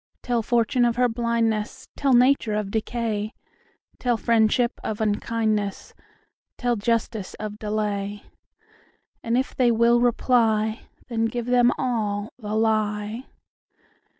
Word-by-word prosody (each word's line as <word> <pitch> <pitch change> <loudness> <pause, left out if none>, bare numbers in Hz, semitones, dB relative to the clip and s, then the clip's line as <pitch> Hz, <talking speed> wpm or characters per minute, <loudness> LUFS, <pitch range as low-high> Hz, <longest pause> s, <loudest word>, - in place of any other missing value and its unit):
Tell 240 -2 0
fortune 235 +2 +1
of 235 -1 +2
her 250 0 +3
blindness; 230 -2 -1
Tell 275 -2 +1
nature 245 -3 +4
of 210 -2 -2
decay; 220 -1 -2 0.6
Tell 245 -2 +1
friendship 230 +1 +2
of 215 - -3
unkindness; 215 -1 -1 0.6
Tell 245 -1 0
justice 220 -2 -2
of 210 0 -6
delay; 205 -1 -3 1.0
And 230 +1 0
if 260 - -1
they 250 -2 +3
will 235 +1 +4
reply, 225 -2 +1 0.2
Then 225 -3 0
give 235 +1 -3
them 245 0 +4
all 215 -4 -2
the 210 -2 -4
lie. 215 +1 0
225 Hz, 120 wpm, -24 LUFS, 215-240 Hz, 1.0 s, nature